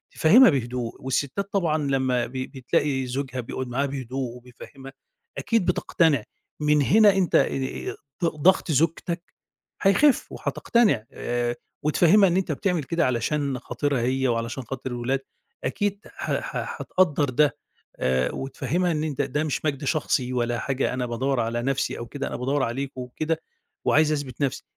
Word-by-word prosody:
فهِمها 235 +11 +7
بهدوء، 125 -4 -2
والستات 140 +10 -2
طبعًا 165 -6 +2
لمّا 130 -4 +1
ب 120 - -14
بتلاقي 130 +1 -1
زوجها 130 0 -3
بيقعد 130 +2 -5
معاها 135 +4 0
بهدوء 130 -2 -4
وبيفهِمها، 135 +3 -12 0.4
أكيد 230 -5 +1
بتقتنع 160 -7 +2 0.4
من 150 0 +3
هنا 210 +7 +6
أنت، 190 -3 +1
آآ، 135 -1 0 0.3
ض - - +4
ضغط 165 +2 +3
زوجتك 165 +3 0 0.6
هيخف 265 +8 +4
وهتقتنع، 205 - +1
آآ، 120 0 -2 0.3
وتفهِمها 180 +6 +5
إن 175 - +1
أنت 185 -3 0
بتعمل 170 +1 0
كده 165 +5 0
علشان 130 +2 0
خاطرها 130 +1 -1
هي، 130 +2 +1
وعلشان 115 +2 -2
خاطر 130 +1 -5
الولاد، 120 +3 -1 0.4
أكيد 205 -1 -1
ح - - -6
ح - - -5
هتقدر 160 -6 +2
ده، 145 +3 +2 0.4
آآ، 65 0 +1
وتفهِمها 170 +6 -1
إن 155 -1 -1
أنت 145 -2 -1
ده 145 +3 -1
مش 155 0 -2
مجد 145 -1 -1
شخصي 130 -4 0
ولا 120 -1 0
حاجة، 135 0 -1
أنا 125 -1 -1
بادَوّر 130 +3 -1
على 115 +1 -1
نفْسِي 135 +1 -1
أو 120 - -5
كده، 140 +3 -4
أنا - - -5
بادَوّر 135 +2 0
عليكم 130 +2 -3
وكده، 155 +6 -3 0.4
وعايز 155 +1 +4
أثبِت 145 -2 -3
نفْسِي، 135 - -1
135 Hz, 155 wpm, -25 LUFS, 125-155 Hz, 0.6 s, فهِمها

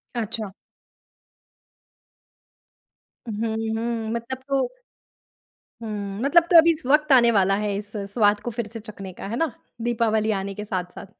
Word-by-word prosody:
अच्छा। 220 -3 -3 2.8
हुँ, 220 +1 -2 0.2
हुँ 225 -1 -2
मतलब 235 +2 -4
तो 275 -1 +2 1.2
हुँ, 205 -2 -5
मतलब 330 +5 +5
तो 345 - +7
अभी 335 +1 +7
वक़्त 300 +1 +4
आने 235 -2 +7
वाला 195 -1 +3
है 205 -1 -1
इस 205 0 -4 0.2
स्वाद 205 -3 +3
को 240 - -4
फिर 235 -1 -4
से 225 +1 -8
चखने 200 -3 -9
का, - - -8
है 225 +4 -3
ना? 320 -2 0 0.3
दीपावली 220 -2 +1
आने 195 -1 -2
के 210 +1 -6
साथ-साथ। 185 -2 -5
220 Hz, 140 wpm, -24 LUFS, 205-235 Hz, 2.8 s, तो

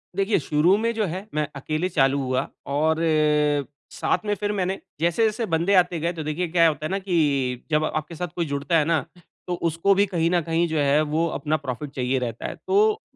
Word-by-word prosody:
देखिए 195 +1 +2
शुरू 155 +5 +3
में 230 +2 0
जो 220 -2 0
है 185 +5 -5
मैं 150 -1 0
अकेले 155 +6 -2
चालू 140 -5 +2
हुआ 130 -1 -1 0.3
और 160 +2 +2
अ, 150 -2 +2 0.3
साथ - - 0
में 210 - +1
फिर 205 0 -2
मैंने 190 -1 -1 0.2
जैसे-जैसे 215 +8 +1
बन्दे 170 +5 +2
आते 180 -2 +3
गए 170 +3 -1
तो 160 -2 -5
देखिए 155 +4 -2
क्या 165 0 +4
होता 155 -1 -2
है - - -2
ना 195 - 0
कि 145 -9 0
जब 155 0 +3
आपके 155 +2 -4
साथ 180 +2 -3
कोई 170 - -1
जुड़ता 140 +2 0
है 155 - +2
ना, 165 -1 +2 0.5
तो 180 - -1 0.2
उसको 165 +5 +2
भी 200 +1 +4
कहीं 170 -4 0
न 175 -1 +2
कहीं 165 +2 0
जो 160 -1 -2
है 145 +1 +3
वो 155 +2 0
अपना 155 0 0
प्रॉफिट 140 0 -5
चाहिए 130 0 0
रहता 120 -2 -5
है। - - -6
तो 425 +2 +3
160 Hz, 220 wpm, -24 LUFS, 150-180 Hz, 0.5 s, क्या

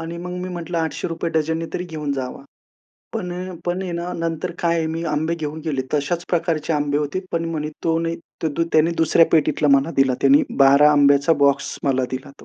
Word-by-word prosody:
आणि 165 +1 -6
मग 180 +1 -6
मी 185 - -4
म्हटलं 170 -1 -4
₹800 165 +1 -2
डझनने 160 +1 -1
तरी 180 - -3
घेऊन 155 -4 -4
जावा. 130 0 -5 0.7
पण 195 -6 -4
अ, 180 0 -6
पण 180 +2 -1
आहे 180 -2 -4
ना, 170 +1 -4
नंतर 165 +1 -2
काय 170 -1 +1
आहे 160 - 0
मी 165 - -3
आंबे 160 +3 0
घेऊन 155 -1 -5
गेले. 140 -5 -1
तशाच 150 +4 -1
प्रकारचे 165 -2 0
आंबे 145 -1 0
होते 150 +5 -2
पण 165 0 0
म्हणे 150 -2 -3 0.2
तो 165 0 +2
नाही, 165 0 -2 0.3
तो 160 - +1
द 165 - +2
त्याने 160 +2 +4
दुसऱ्या 165 +1 +5
पेटीतला 150 -1 +2
मला 140 +4 +3
दिला. 135 -2 +3
त्याने 140 +2 +5 0.2
12 140 +2 +7
आंब्याचा 140 +2 +4
बॉक्स 140 0 +1
मला 130 -2 +1
दिला 130 +2 -6
तो. - - -15
160 Hz, 205 wpm, -21 LUFS, 145-170 Hz, 0.7 s, 12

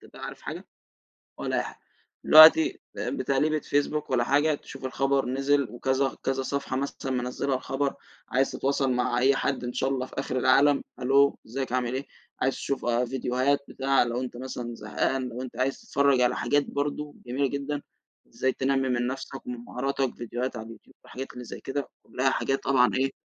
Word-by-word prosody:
تبقى - - -11
عارف - - -7
حاجة؟ - - -7 0.7
ولا - - -2
أي - - +1
حاجة. - - -9 0.5
الوقتي 160 - +9 0.3
ت - - -7
بتقليبة 155 - 0
فيسبوك 145 +2 -1
والّا 125 -2 +2
حاجة، 145 +4 +3
تشوف 135 -1 -10
الخبر 135 +1 +1
نزل 135 +1 +1
وكذا 130 +3 0
كذا 135 0 0
صفحة 140 -1 -2
مثلًا 135 0 -3
منزّلة 125 +2 -1
الخبر. 135 +2 -2 0.3
عايز 130 +2 +2
تتواصل 135 -1 0
مع 125 -1 +1
أي 135 +2 +4
حد 135 -1 -1
إن 120 0 -4
شاء 130 - 0
الله 130 -2 -1
في - - -15
آخر 130 -1 -2
العالم، 135 +3 +4 0.2
"ألو 140 +2 +4
أزيّك 130 +2 -4
عامل 125 -1 0
إيه؟" 135 +2 -3 0.4
عايز 135 +1 +2
تشوف 140 - -3
فيديوهات، 125 +3 +1
بتاع، 135 0 +2
لو 120 +1 -2
أنت 125 -1 -5
مثلًا 125 -2 -5
زهقان، 125 +4 -1
لو 120 +1 -6
أنت 130 -1 -8
عايز 135 +1 0
تتفرّج 140 -2 +2
على 125 - +3
حاجات 145 +4 +1
برضه 145 +1 -3
جميلة 130 +3 0
جدًا، 140 +1 -3 0.5
إزاي 130 - 0
تنمّي 135 0 0
من 120 -1 +1
نفسك 135 +1 -6
ومن 125 0 -4
مهاراتك، 135 +1 -2
فيديوهات 120 +2 -4
على 110 - -6
اليوتيوب. 115 -1 -14
والحاجات 135 +2 -7
اللي 125 - -8
زي - - -8
كده 140 +1 -3
كلها 130 +1 0
حاجات، 135 0 -1
طبعًا 130 -2 +4
إيه 135 +1 +1
135 Hz, 180 wpm, -27 LUFS, 125-140 Hz, 0.7 s, الوقتي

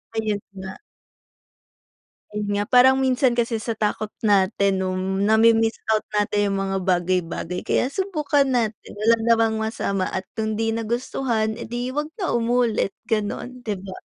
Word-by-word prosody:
Ayun 215 -2 -1 0.2
nga. 190 0 -8 1.5
Ayun 210 -1 -4
nga, 205 0 +1
parang 260 +1 +6
minsan 260 -1 +2
kasi 235 -1 0
sa 225 +1 -3
takot 215 0 -2
natin 200 -1 +2
nung 185 +1 -2
nami-miss 225 +1 +4
out 215 -1 +2
natin 205 0 +1
yung 195 - -1
mga 195 0 -1
bagay-bagay. 180 -1 -1
Kaya 250 - +1
subukan 300 -5 +1
natin 235 -5 -1
wala 215 +3 +3
namang 225 -1 +3
masama 210 -3 -1
at 185 - -3 0.2
kung 220 0 -1
'di 225 +1 0
nagustuhan 230 0 -1
eh - - -6
di 240 +2 -3
'wag 295 +3 -2 0.2
na 365 - 0
umulit 230 -4 +1 0.2
gano'n, 235 +3 -3
'di 205 -4 -3
ba? 190 -1 -8
220 Hz, 150 wpm, -23 LUFS, 200-240 Hz, 1.5 s, parang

